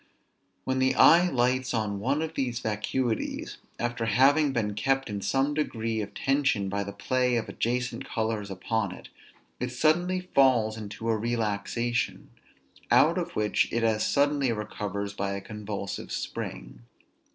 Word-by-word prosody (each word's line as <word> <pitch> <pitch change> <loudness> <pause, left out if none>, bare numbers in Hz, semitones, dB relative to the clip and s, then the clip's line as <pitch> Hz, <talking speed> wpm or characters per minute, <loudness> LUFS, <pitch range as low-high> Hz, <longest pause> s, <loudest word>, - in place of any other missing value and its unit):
When 130 0 -1
the 130 0 +2
eye 175 +6 +7
lights 125 -2 +1
on 105 -3 -1
one 135 +8 0
of 160 0 -4
these 125 -5 -1
vacuities, 110 +2 -2 0.2
after 120 -1 -2
having 140 +6 +4
been 110 -5 -1
kept 135 +3 0
in 100 -1 -3
some 135 +6 +1
degree 115 -7 -1
of 100 -1 -7
tension 135 -8 +1
by 100 +1 -1
the 100 - -6
play 125 +5 0
of 115 - 0
the - - -8
adjacent 125 0 -2
colors 110 -2 -2
upon 100 +1 -2
it, - - -13 0.5
it 125 0 -2
suddenly 175 +8 +2
falls 120 -5 +4
into 110 +1 -6
a 115 - +3
relaxation; 115 +1 -2 0.6
out - - +5
of - - -5
which 105 -1 +1
it 115 0 0
as 110 -1 +2
suddenly 140 -2 +2
recovers 105 -2 -4
by 100 -1 -2
a 100 - -3
convulsive 105 -1 -6
spring. - - -5
115 Hz, 150 wpm, -27 LUFS, 105-130 Hz, 0.6 s, eye